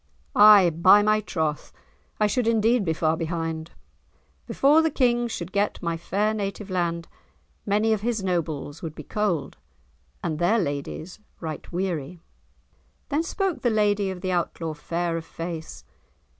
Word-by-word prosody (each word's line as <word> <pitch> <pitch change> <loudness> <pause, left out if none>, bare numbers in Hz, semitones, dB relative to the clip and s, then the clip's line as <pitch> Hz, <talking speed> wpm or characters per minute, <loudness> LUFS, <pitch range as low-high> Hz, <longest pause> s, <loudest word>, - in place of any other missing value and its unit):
"Ay, 205 -4 +8
by 185 +6 +6
my 215 0 +3
troth! 160 -7 -3 0.5
I 210 - +4
should 225 +3 0
indeed 230 0 +3
be 165 - 0
far 160 0 +1
behind. 165 -1 -3 0.8
Before 295 +4 +4
the 320 - +2
King 240 -4 +1
should 180 -5 -5
get 205 +1 0
my 170 -1 -2
fair 200 +6 -1
native 200 -1 -4
land, 170 -2 -1 0.6
many 210 +2 +2
of 215 - -2
his 225 -2 -1
nobles 160 -5 -2
would 160 -2 -6
be 150 - -8
cold, 175 - -2 0.7
and 155 -3 -2
their 190 +7 +3
ladies 155 +1 -4 0.2
right 160 -2 -6
weary." 175 -3 -3 0.9
Then 295 +2 +1
spoke 375 +1 -2
the 240 - +2
lady 205 -2 +1
of 185 -1 -6
the 185 -1 -2
Outlaw, 170 -2 -2
fair 170 +2 -2
of 165 - -6
face. 165 -1 -7
185 Hz, 150 wpm, -25 LUFS, 165-215 Hz, 0.9 s, Ay